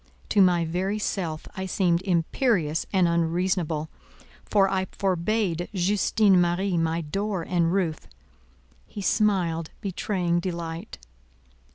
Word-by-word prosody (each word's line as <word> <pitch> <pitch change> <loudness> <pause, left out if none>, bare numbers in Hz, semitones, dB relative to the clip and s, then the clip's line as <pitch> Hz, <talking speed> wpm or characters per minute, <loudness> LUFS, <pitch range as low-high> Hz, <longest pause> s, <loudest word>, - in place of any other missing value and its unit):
To 205 - +4
my 175 -3 +4
very 185 +5 -1
self 170 -7 -3
I 190 0 -4
seemed 175 -2 +1
imperious 170 - 0
and 185 -3 +3
unreasonable, 170 -1 0 0.6
for 200 -2 +3
I 190 -1 0
forbade 185 -1 -1
Justine 195 +1 +3
Marie 175 +2 0
my 165 0 0
door 195 +4 -2
and 170 -1 +1
roof; 175 -5 -1 0.8
he 205 - -7
smiled, 180 -7 +1
betraying 180 -3 -1
delight. 170 -2 -5
180 Hz, 110 wpm, -25 LUFS, 170-195 Hz, 0.8 s, To